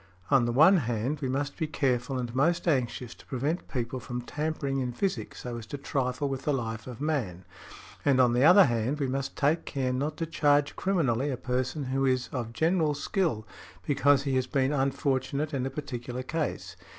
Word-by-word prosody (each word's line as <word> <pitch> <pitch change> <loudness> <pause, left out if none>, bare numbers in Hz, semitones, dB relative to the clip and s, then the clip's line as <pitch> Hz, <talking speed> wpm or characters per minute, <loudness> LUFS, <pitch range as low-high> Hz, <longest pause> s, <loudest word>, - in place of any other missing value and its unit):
On 135 -3 +5
the 120 - 0
one 160 +10 +6
hand, 120 +1 -1
we 135 - -1
must 140 +2 -2
be 160 - -1
careful 130 -3 0
and 120 -2 -4
most 165 +8 +1
anxious 125 -5 0
to - - -18
prevent 140 +7 -2
people 125 -1 -3
from 120 +1 -5
tampering 145 -1 -2
in 125 -2 -2
physic 190 +8 -2
so 120 -1 -6
as 110 - -10
to 145 - -5
trifle 135 0 -1
with 135 -1 -3
the 150 - 0
life 110 -3 -4
of 125 -2 -8
man; 115 - -2 0.6
and 135 -2 +3
on 125 -2 +5
the 125 +2 +3
other 180 +6 +8
hand, 120 +3 0
we 140 - +1
must 135 +1 -3
take 150 +4 +2
care 130 -3 -2
not 145 +4 -2
to 165 - -1
charge 145 -3 +2
criminally 145 -9 +1
a 130 - -2
person 130 +4 -2
who 135 +1 -1
is 130 -2 +1
of 120 -4 -4
general 160 +2 +1
skill 150 - -1 0.4
because 140 -1 +3
he 135 -2 0
has 130 -1 0
been 135 +1 +1
unfortunate 140 +2 0
in 130 -1 -1
a - - -2
particular 130 -3 -5
case. 155 +2 -3
135 Hz, 200 wpm, -28 LUFS, 125-150 Hz, 0.6 s, other